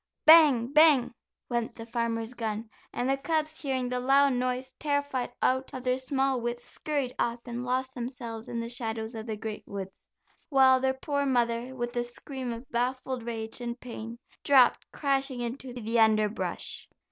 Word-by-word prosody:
"Bang, 290 Hz, -6 st, +7 dB
bang," 300 Hz, -6 st, +6 dB, 0.3 s
went 235 Hz, -2 st, -2 dB
the 225 Hz, -, -8 dB
farmer's 230 Hz, 0 st, -2 dB
gun, 220 Hz, -2 st, -3 dB, 0.2 s
and 245 Hz, -, -2 dB
the 270 Hz, 0 st, +2 dB
cubs 315 Hz, +1 st, -1 dB
hearing 260 Hz, -3 st, -1 dB
the 250 Hz, 0 st, -1 dB
loud 275 Hz, +2 st, +4 dB
noise, 255 Hz, +1 st, -2 dB
terrified 285 Hz, -4 st, -1 dB
out 260 Hz, +1 st, +1 dB
of 255 Hz, -, -6 dB
their 255 Hz, 0 st, +1 dB
small 265 Hz, -1 st, 0 dB
wits, 240 Hz, +1 st, -3 dB
scurried 285 Hz, -5 st, -2 dB
off 235 Hz, 0 st, +1 dB
and 240 Hz, 0 st, -4 dB
lost 255 Hz, +1 st, -1 dB
themselves 235 Hz, -2 st, -6 dB
in 235 Hz, -, -3 dB
the 230 Hz, -, -3 dB
shadows 225 Hz, -1 st, -4 dB
of 220 Hz, 0 st, -6 dB
the 220 Hz, -1 st, -3 dB
great 215 Hz, 0 st, -5 dB
woods, 195 Hz, -1 st, -6 dB, 0.5 s
while 265 Hz, -3 st, +6 dB
their 265 Hz, 0 st, +1 dB
poor 285 Hz, +1 st, -1 dB
mother, 240 Hz, 0 st, 0 dB
with 240 Hz, 0 st, -4 dB
a 240 Hz, -, +1 dB
scream 250 Hz, +1 st, -6 dB
of 235 Hz, +2 st, -7 dB
baffled 255 Hz, +1 st, -1 dB
rage 225 Hz, 0 st, -5 dB
and 240 Hz, 0 st, -4 dB
pain 230 Hz, -1 st, -7 dB, 0.3 s
dropped 260 Hz, -4 st, +4 dB
crashing 275 Hz, -2 st, 0 dB
into 245 Hz, +2 st, -5 dB
the 235 Hz, -1 st, -1 dB
underbrush. 215 Hz, -1 st, +1 dB
250 Hz, 170 wpm, -28 LUFS, 235-265 Hz, 0.5 s, Bang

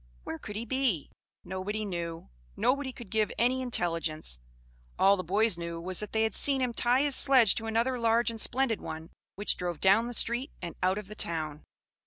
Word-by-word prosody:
Where 160 Hz, -, -6 dB
could 210 Hz, -, -8 dB
he 225 Hz, +3 st, -4 dB
be? 240 Hz, -, 0 dB, 0.3 s
Nobody 200 Hz, +3 st, -4 dB
knew; 170 Hz, -3 st, -5 dB, 0.3 s
nobody 270 Hz, +1 st, +1 dB
could 240 Hz, -5 st, -12 dB
give 220 Hz, -1 st, +1 dB
any 255 Hz, +2 st, +2 dB
intelligence. 165 Hz, -, -2 dB, 0.6 s
All 195 Hz, +1 st, +5 dB
the 185 Hz, -, -4 dB
boys 200 Hz, +1 st, +2 dB
knew 170 Hz, 0 st, -5 dB
was, 180 Hz, +2 st, -1 dB
that 210 Hz, -, -2 dB
they 220 Hz, 0 st, +1 dB
had 220 Hz, -2 st, 0 dB
seen 275 Hz, -2 st, +3 dB
him 250 Hz, -2 st, -1 dB
tie 245 Hz, +4 st, +2 dB
his 285 Hz, -2 st, +4 dB
sledge 255 Hz, -7 st, +7 dB
to 225 Hz, -, -4 dB
another 235 Hz, +3 st, 0 dB
large 230 Hz, +1 st, +2 dB
and 225 Hz, -1 st, -7 dB
splendid 255 Hz, -3 st, 0 dB
one, 160 Hz, 0 st, -7 dB, 0.2 s
which 205 Hz, -, -1 dB
drove 175 Hz, -3 st, -4 dB
down 210 Hz, +5 st, +4 dB
the 245 Hz, -, -5 dB
street 240 Hz, +6 st, +1 dB
and 170 Hz, -, -6 dB
out 185 Hz, +2 st, +2 dB
of 210 Hz, -, -5 dB
the 210 Hz, -, -8 dB
town. 155 Hz, -6 st, -4 dB
215 Hz, 200 wpm, -29 LUFS, 175-240 Hz, 0.6 s, sledge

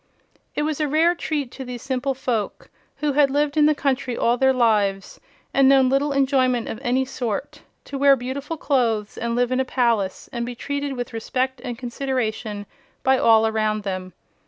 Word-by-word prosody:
It 295 Hz, -, 0 dB
was 310 Hz, -1 st, -2 dB
a 300 Hz, -, +1 dB
rare 320 Hz, +4 st, +3 dB
treat 295 Hz, -7 st, -3 dB
to 265 Hz, -, -7 dB
these 250 Hz, -2 st, -7 dB
simple 265 Hz, 0 st, -1 dB
folk, 235 Hz, -5 st, -3 dB, 0.2 s
who 300 Hz, -1 st, -1 dB
had 285 Hz, 0 st, +4 dB
lived 290 Hz, +1 st, 0 dB
in 300 Hz, -1 st, +5 dB
the 305 Hz, -, +3 dB
country 265 Hz, -4 st, -1 dB
all 235 Hz, -, +2 dB
their 265 Hz, +2 st, +3 dB
lives 210 Hz, -6 st, +1 dB, 0.3 s
and 270 Hz, -1 st, +5 dB
known 265 Hz, -2 st, +5 dB
little 275 Hz, +2 st, +1 dB
enjoyment 260 Hz, -3 st, +2 dB
of 220 Hz, -, -5 dB
any 260 Hz, 0 st, +1 dB
sort, 240 Hz, -5 st, -4 dB, 0.2 s
to 275 Hz, -, -6 dB
wear 280 Hz, 0 st, +6 dB
beautiful 270 Hz, +5 st, -5 dB
clothes 230 Hz, -8 st, 0 dB
and 235 Hz, 0 st, -2 dB
live 245 Hz, 0 st, +1 dB
in 255 Hz, -, +1 dB
a -, -, +3 dB
palace 235 Hz, -7 st, 0 dB
and 235 Hz, -1 st, -2 dB
be 245 Hz, +1 st, -5 dB
treated 285 Hz, +2 st, -3 dB
with 245 Hz, -2 st, -5 dB
respect 255 Hz, +3 st, -2 dB
and 245 Hz, -3 st, -5 dB
consideration 235 Hz, -5 st, -3 dB, 0.4 s
by 265 Hz, 0 st, +3 dB
all 225 Hz, -1 st, +5 dB
around 215 Hz, -1 st, 0 dB
them. 185 Hz, -2 st, -4 dB
255 Hz, 185 wpm, -22 LUFS, 230-275 Hz, 0.4 s, wear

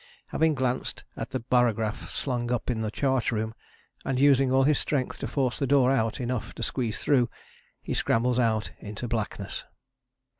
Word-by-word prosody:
Having 160 Hz, -1 st, +2 dB
glanced 130 Hz, -1 st, -1 dB
at -, -, -5 dB
the 130 Hz, -, -2 dB
barograph 115 Hz, -3 st, +1 dB
slung 120 Hz, -3 st, -1 dB
up 125 Hz, 0 st, 0 dB
in 115 Hz, -, -2 dB
the 110 Hz, -1 st, -1 dB
chart 130 Hz, +2 st, +1 dB
room, 110 Hz, 0 st, -2 dB, 0.5 s
and 130 Hz, -1 st, -1 dB
using 135 Hz, -2 st, +5 dB
all 135 Hz, 0 st, +4 dB
his 145 Hz, +1 st, +4 dB
strength 135 Hz, -4 st, -1 dB
to -, -, -3 dB
force 130 Hz, -3 st, 0 dB
the 140 Hz, -, 0 dB
door 135 Hz, -2 st, +4 dB
out 115 Hz, -5 st, +1 dB
enough 125 Hz, -2 st, -3 dB
to 115 Hz, -, -4 dB
squeeze 115 Hz, -2 st, -1 dB
through, 125 Hz, -5 st, +3 dB, 0.5 s
he -, -, -3 dB
scrambles 125 Hz, +2 st, +2 dB
out 110 Hz, -2 st, +1 dB
into 105 Hz, +4 st, -6 dB
blackness. 105 Hz, -4 st, -3 dB
125 Hz, 175 wpm, -27 LUFS, 115-135 Hz, 0.5 s, using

